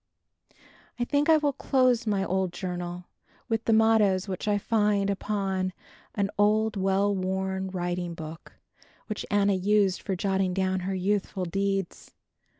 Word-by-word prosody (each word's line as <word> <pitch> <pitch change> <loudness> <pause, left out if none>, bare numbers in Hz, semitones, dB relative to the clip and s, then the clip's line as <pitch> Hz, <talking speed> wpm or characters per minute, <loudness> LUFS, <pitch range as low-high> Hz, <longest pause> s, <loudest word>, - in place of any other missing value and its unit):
I 240 - -1
think 290 +4 +1
I 320 - +7
will 295 -2 0
close 255 -4 +2
my 200 -2 +1
old 190 -1 0
journal 175 -1 -5 0.4
with 225 0 -1
the - - +2
mottoes 220 -4 +4
which 190 +1 -4
I 205 -1 +3
find 205 -1 +1
upon 195 -2 -2 0.4
an 200 -1 0
old 215 +1 +3
well 195 +1 +1
worn 190 0 -2
writing 175 -1 -3
book 160 +1 -9 0.5
which 215 - -5
Anna 200 0 +3
used 195 0 +2
for 195 - -2
jotting 190 0 0
down 190 -1 0
her 190 +1 -3
youthful 190 0 -1
deeds. 195 +1 -3
195 Hz, 145 wpm, -27 LUFS, 185-210 Hz, 0.5 s, I